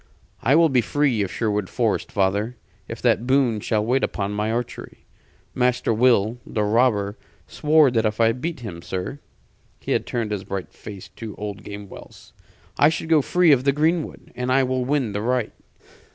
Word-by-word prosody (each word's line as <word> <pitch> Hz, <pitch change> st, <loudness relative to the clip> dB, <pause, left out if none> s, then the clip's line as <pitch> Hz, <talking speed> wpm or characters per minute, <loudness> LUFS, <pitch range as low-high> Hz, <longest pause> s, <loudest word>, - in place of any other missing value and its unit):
"I 135 Hz, +6 st, +3 dB
will 165 Hz, 0 st, +5 dB
be 130 Hz, -3 st, +3 dB
free 135 Hz, -2 st, +1 dB
of 95 Hz, -2 st, -2 dB
Sherwood 105 Hz, -4 st, -1 dB
Forest, 115 Hz, -4 st, -1 dB
father, 100 Hz, +4 st, 0 dB, 0.3 s
if -, -, -8 dB
that 120 Hz, -, +2 dB
boon 130 Hz, -5 st, +2 dB
shall 105 Hz, 0 st, 0 dB
wait 130 Hz, +3 st, +1 dB
upon 100 Hz, 0 st, -2 dB
my 105 Hz, +1 st, -1 dB
archery. 120 Hz, +1 st, -5 dB, 0.5 s
Master 125 Hz, -2 st, +1 dB
Will, 115 Hz, -1 st, +3 dB
the 105 Hz, -, -2 dB
robber, 105 Hz, -1 st, +1 dB, 0.3 s
swore 150 Hz, -3 st, +3 dB
that 115 Hz, -2 st, +1 dB
if 105 Hz, +1 st, -4 dB
I 115 Hz, 0 st, +5 dB
beat 130 Hz, +4 st, -4 dB
him, 90 Hz, -7 st, -7 dB
sir" 95 Hz, +11 st, -5 dB, 0.6 s
he -, -, -5 dB
had -, -, 0 dB
turned 115 Hz, -3 st, -2 dB
his 100 Hz, -2 st, -3 dB
bright 95 Hz, -1 st, -6 dB
face 100 Hz, -3 st, -10 dB
to 110 Hz, -2 st, -7 dB
old 105 Hz, -1 st, -6 dB
Gamewell's 100 Hz, -1 st, -11 dB, 0.5 s
"I 145 Hz, -, +7 dB
should 160 Hz, 0 st, -4 dB
go 160 Hz, -2 st, +5 dB
free 175 Hz, +3 st, +3 dB
of 130 Hz, -3 st, +4 dB
the 140 Hz, -, +4 dB
greenwood. 155 Hz, +3 st, -1 dB
And 125 Hz, +1 st, -2 dB
I 135 Hz, +1 st, +4 dB
will 130 Hz, 0 st, 0 dB
win 130 Hz, -4 st, 0 dB
the 100 Hz, +1 st, -3 dB
right." 125 Hz, 0 st, -1 dB
120 Hz, 180 wpm, -23 LUFS, 105-135 Hz, 0.6 s, I